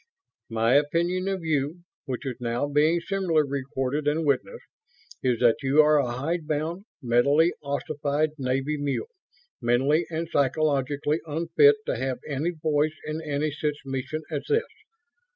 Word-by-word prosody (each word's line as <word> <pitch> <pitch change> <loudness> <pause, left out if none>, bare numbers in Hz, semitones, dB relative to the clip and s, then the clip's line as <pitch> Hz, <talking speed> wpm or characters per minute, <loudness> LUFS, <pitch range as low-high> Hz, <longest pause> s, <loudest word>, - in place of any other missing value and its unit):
My 115 +1 +2
opinion 170 +6 +2
of 190 -3 -2
you, 155 +2 -1 0.2
which 130 +1 -4
is 130 -3 -4
now 120 +3 -1
being 155 +4 +3
similarly 170 -5 +1
recorded 135 +1 -2
and 155 +2 +1
witnessed, 470 - -1 0.6
is 125 -3 +1
that 120 +2 +5
you 140 +3 +5
are 150 0 +4
a 125 -4 0
hidebound, 160 +5 -2 0.2
mentally 140 +8 +3
ossified 145 +1 -1
Navy 135 +3 -1
mule; 145 - -2 0.5
mentally 135 +7 +2
and 165 0 -3
psychologically 145 +1 +1
unfit 170 - +4
to - - -1
have 130 -1 -2
any 150 +3 -1
voice 155 -2 0
in 155 +1 -3
any 150 0 -1
such 150 0 -2
mission 135 +3 -4
as 145 -2 -1
this. 450 +1 +3
150 Hz, 140 wpm, -26 LUFS, 135-160 Hz, 0.6 s, that